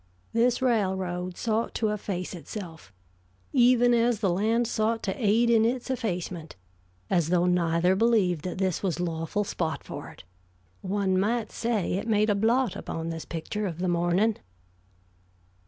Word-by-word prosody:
This 245 +2 +2
railroad 185 -6 0
sought 225 0 -1
to 220 - +1
efface 195 -4 -3
itself, 165 - -8 0.6
even 245 0 +5
as 235 -2 +2
the 195 -4 +1
land 220 +6 +1
sought 225 0 0
to 190 - -2
aid 220 +3 +4
in 225 -1 +5
its 245 +3 -1
effacement, 180 - -4 0.6
as 170 -3 +2
though 180 0 +3
neither 180 0 +2
believed 200 -7 +2
that 185 - -4
this 185 -3 0
was 185 -3 -1
lawful 170 +3 -1
spot 160 -6 -3
for - - -7
it. - - -14 0.6
One 190 -1 0
might 220 +3 0
say 230 -5 -1
it 195 +5 -2
made 215 -1 +3
a - - +2
blot 230 +2 +2
upon 165 0 -5
this 165 -1 -5
picture 195 +6 -4
of 165 -4 -5
the 185 +1 -2
morning. 175 +5 +2
195 Hz, 155 wpm, -27 LUFS, 175-225 Hz, 0.6 s, even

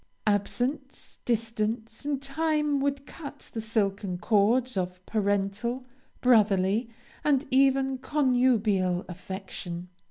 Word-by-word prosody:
Absence, 245 +7 -1
distance, 225 +1 -2
and 290 -2 0
time 300 +1 0
would 280 0 -1
cut 285 0 -10
the 225 - -3
silken 200 -4 -1
cords 230 +6 +2
of 180 0 -3
parental, 205 +4 -1 0.4
brotherly, 215 -2 +4 0.3
and 290 -1 +3
even 270 0 +3
connubial 240 -10 +2
affection. 180 -1 -6
230 Hz, 95 wpm, -28 LUFS, 200-270 Hz, 0.4 s, brotherly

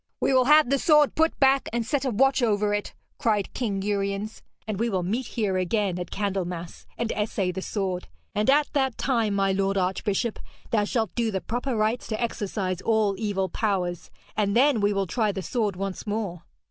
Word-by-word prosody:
'We - - +2
will 255 -1 +5
have 300 -2 +6
the 275 - +3
sword 300 -1 +5
put 320 +1 +1
back 270 0 +4
and 235 0 -1
set 280 +2 -1
a - - +1
watch 265 +4 +3
over 210 -3 +2
it,' 205 0 -3 0.2
cried 210 -4 0
King 200 -6 -2
Uriens, 200 +1 -2 0.3
'and 210 -2 -3
we 235 +1 +1
will 190 -4 -1
meet 225 +8 -2
here 205 -5 -1
again 185 0 0
at 175 - -5
Candlemas, 180 -4 -4
and 235 -1 -1
essay 205 -3 -1
the 190 - -5
sword. 190 -3 -3 0.3
And 210 +5 +1
at 290 +1 +3
that 265 -4 +1
time, 230 -6 +1
my 195 -1 +2
lord 195 +1 0
archbishop, 195 +4 -1 0.3
thou 210 -2 +2
shalt 220 -2 -1
do 235 -2 0
the 195 -3 -1
proper 245 +8 -3
rites 220 +3 0
to 215 - -3
exorcise 195 -5 -2
all 220 -3 +2
evil 200 -3 0
powers, 185 -3 -2 0.3
and 205 -1 +1
then 265 -3 +4
we 205 0 +3
will 195 -1 0
try 215 +3 0
the 190 -1 -5
sword 215 -4 -1
once 195 +2 -5
more.' 200 -5 -3
210 Hz, 200 wpm, -26 LUFS, 195-235 Hz, 0.3 s, have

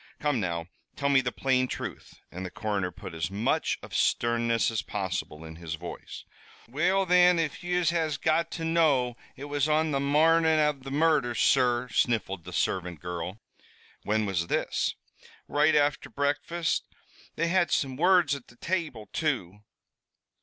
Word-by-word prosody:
Come 145 -4 0
now, 85 -4 -2 0.3
tell 140 -1 0
me 135 -2 +5
the 125 -1 -2
plain 130 +5 +1
truth," - - -7 0.2
and 90 - -6
the 95 - -4
coroner 100 -3 -2
put 85 - -10
as 80 0 -2
much 100 +4 0
of - - -11
sternness 115 -1 +1
as 110 - -1
possible 95 -5 -4
in 80 0 -10
his 80 -1 -5
voice. 85 +1 -9 0.4
"Well, 180 +10 +1
thin, 180 0 +5
if 160 -1 -2
yez 175 -1 +1
has 160 -4 0
got 165 +1 +1
to 165 - -4
know, 145 -7 +2 0.2
it 135 - -10
was 145 0 -1
on 155 +1 +2
the 140 - +1
marnin' 160 +3 +4
av 150 -2 +1
the 135 - -8
murders, 145 -5 +2
sur," 125 -2 +3
sniffled 100 -9 0
the 90 - -8
servant 90 -3 -1
girl. 90 +4 -5 0.6
"When 110 +1 0
was 90 -4 -1
this?" - - -1 0.5
"Right 150 +2 +3
afther 145 -1 +1
breakfast. 145 +4 -1 0.5
They 165 +1 0
had 175 -2 +2
some 135 -2 0
words 175 -1 +4
at 140 -3 -6
the 120 - -18
table, 155 - -3
too." 110 - -2
135 Hz, 160 wpm, -28 LUFS, 100-160 Hz, 0.6 s, me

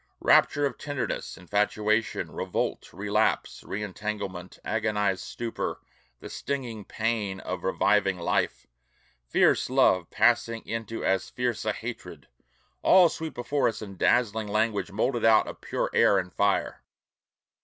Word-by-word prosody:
Rapture 145 0 +4
of 135 -4 -3
tenderness, 145 -3 -4
infatuation, 105 +4 0
revolt, - - -3
relapse, 105 +2 0
re 105 +2 -4
entanglement, 100 -3 -5
agonized 105 -3 0
stupor, 115 -1 -4 0.4
the - - -8
stinging 120 -7 -4
pain 110 -4 -2
of 90 -1 -5
reviving 95 0 +2
life, 85 - -1 0.6
fierce - - +3
love 95 -10 +3
passing 115 -1 +2
into 115 0 -4
as 95 -1 +1
fierce 125 -3 -2
a - - +2
hatred, - - -8 0.5
all 185 -2 +6
sweep 160 -1 -6
before 140 +4 0
us 110 - -3
in 100 -2 -9
dazzling 110 +1 +2
language 105 -1 0
molded 120 +4 0
out 110 -1 +6
of - - -8
pure - - -2
air 100 - +5
and 90 -1 -3
fire. 100 -1 0
105 Hz, 130 wpm, -27 LUFS, 100-115 Hz, 0.6 s, all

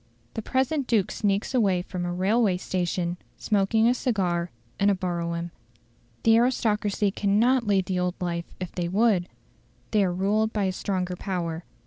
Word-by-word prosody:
The 225 - -3
present 265 +4 0
Duke 215 -3 +2
sneaks 205 +3 -1
away 195 -8 +2
from 180 -1 -4
a 175 - -2
railway 190 +2 +2
station, 180 -1 -2 0.2
smoking 215 +2 +2
a 245 - +4
cigar, 180 -9 -1 0.3
in 200 - +4
a 200 - +3
brougham." 170 -2 -3 0.7
The 225 0 +6
aristocracy 215 -4 +1
cannot 225 +5 +2
lead 195 -2 +2
the 185 -1 -1
old 180 0 -1
life 170 -1 -2
if 185 -2 -5
they 175 -1 -2
would; 195 -1 +2 0.6
they 210 -2 +3
are 185 - +1
ruled 205 +4 +1
by 210 -2 -1
a 190 - +1
stronger 185 -1 -2
power. 170 -3 -4
195 Hz, 160 wpm, -26 LUFS, 180-220 Hz, 0.7 s, The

